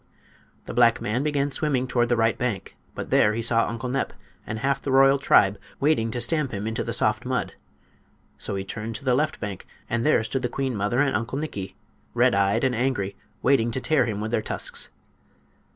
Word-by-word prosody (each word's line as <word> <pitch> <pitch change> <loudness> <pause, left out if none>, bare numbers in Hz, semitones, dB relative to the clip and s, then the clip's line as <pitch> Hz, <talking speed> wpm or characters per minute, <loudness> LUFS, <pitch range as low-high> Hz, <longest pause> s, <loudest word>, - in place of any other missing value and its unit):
The - - -6
black 115 -1 +4
man 115 +5 -1
began 145 -1 0
swimming 135 -3 0
toward 120 -2 +1
the 120 - +3
right 115 0 +2
bank, 120 -7 -3 0.2
but - - -6
there 105 +1 +4
he 115 - -2
saw 115 0 +3
Uncle 115 +2 -4
Nep 130 +2 -2 0.3
and 110 - -3
half 135 +4 0
the 140 - -3
royal 135 +1 +5
tribe 100 -6 +4 0.2
waiting 140 -6 +2
to 120 - -3
stamp 135 +2 0
him 100 0 -4
into 110 +2 -2
the 115 - -4
soft 110 0 +1
mud. 125 0 -2 0.9
So - - -2
he 95 - -3
turned 110 +3 -5
toward 135 - -6
the 130 - +3
left 150 +4 0
bank, 100 -4 -6 0.2
and 120 0 -1
there 150 -6 +3
stood 125 +4 -2
the 125 - -1
queen 135 -1 -2
mother 105 +6 +1
and 140 -2 +1
Uncle 120 +3 -2
Nikki, 105 -11 -5 0.4
red - - +4
eyed 100 +4 +2
and 130 -1 +2
angry, 115 -6 -1 0.3
waiting 125 -3 +3
to 120 - -2
tear 155 +1 +2
him 105 -3 -3
with 110 +1 -3
their 110 - +1
tusks. - - -2
120 Hz, 210 wpm, -25 LUFS, 110-135 Hz, 0.9 s, royal